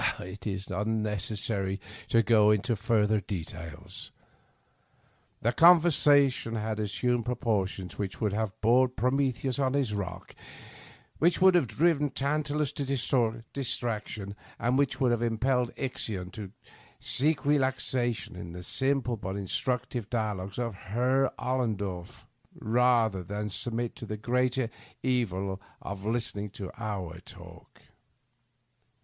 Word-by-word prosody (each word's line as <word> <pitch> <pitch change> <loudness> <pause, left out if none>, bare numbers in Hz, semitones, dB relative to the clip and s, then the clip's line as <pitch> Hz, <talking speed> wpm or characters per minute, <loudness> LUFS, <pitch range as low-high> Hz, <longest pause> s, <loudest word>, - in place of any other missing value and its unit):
It 95 +5 -7
is 95 -1 -4
unnecessary 105 -1 -1 0.3
to 115 0 +4
go 110 -1 +5
into 105 +3 +2
further 110 0 +2
details. 90 -1 -6 1.3
The 120 - +3
conversation 145 -8 +5
had 110 0 -2
assumed 115 +3 0
proportions 100 -8 -1
which 100 -2 -3
would 105 -3 0
have 110 0 -2
bored 125 +3 +4
Prometheus 130 +1 0
on 135 -1 +2
his 135 -6 +1
rock, 90 -3 -5 0.9
which 170 +2 +3
would 190 0 +7
have 175 -8 +4
driven 150 +6 +2
Tantalus 145 +1 0
to 125 -4 0
distraction, 110 -6 -3 0.2
and 120 +2 +1
which 135 -1 +1
would 130 -3 +3
have 120 -1 +1
impelled 120 +2 +1
Ixion 105 -8 -3
to 100 0 -7 0.5
seek 150 +3 +1
relaxation 130 -6 +1
in 85 -1 -7
the 90 0 -7
simple 130 +2 +1
but 95 -2 -4
instructive 120 +3 -2
dialogues 105 -4 -2
of 120 -2 -1 0.2
Eerr 130 +2 +3
Ollendorff, 105 -8 -2 0.3
rather 115 -3 +3
than 105 +3 -4
submit 115 +7 -2
to 115 - -7
the 105 - -4
greater 125 +1 0 0.3
evil 100 -7 0 0.2
of 100 -1 -6
listenmg 105 -3 -2
to 95 -3 -6
our 100 -6 -4
talk. - - -14
115 Hz, 120 wpm, -29 LUFS, 100-130 Hz, 1.3 s, would